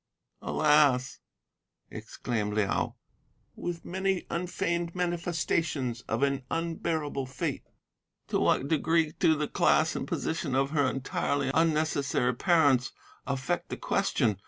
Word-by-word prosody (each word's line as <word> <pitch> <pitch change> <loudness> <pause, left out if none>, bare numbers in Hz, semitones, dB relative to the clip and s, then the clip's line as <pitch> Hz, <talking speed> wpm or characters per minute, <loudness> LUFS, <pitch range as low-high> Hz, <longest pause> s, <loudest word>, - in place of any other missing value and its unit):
"'Alas!' 145 -4 +3 0.7
exclaimed 105 -4 -3
Liao, 105 -2 0 0.6
with 175 -1 -5
many 190 0 -1
unfeigned 170 -1 -2
manifestations 165 -7 -1
of 115 +5 0
an 140 -1 +1
unbearable 160 -4 -2
fate, 130 0 -4 0.6
'to - - 0
what 135 - +2
degree 160 +1 +2
do 160 - +4
the 150 0 -1
class - - +2
and - - -3
position 155 -4 -2
of 135 +1 +1
her 145 -4 +2
entirely 135 +1 -1
unnecessary 155 -5 +1
parents 145 -4 +3 0.3
affect 140 +6 -2
the - - -4
question? 120 - 0
150 Hz, 110 wpm, -29 LUFS, 135-165 Hz, 0.7 s, do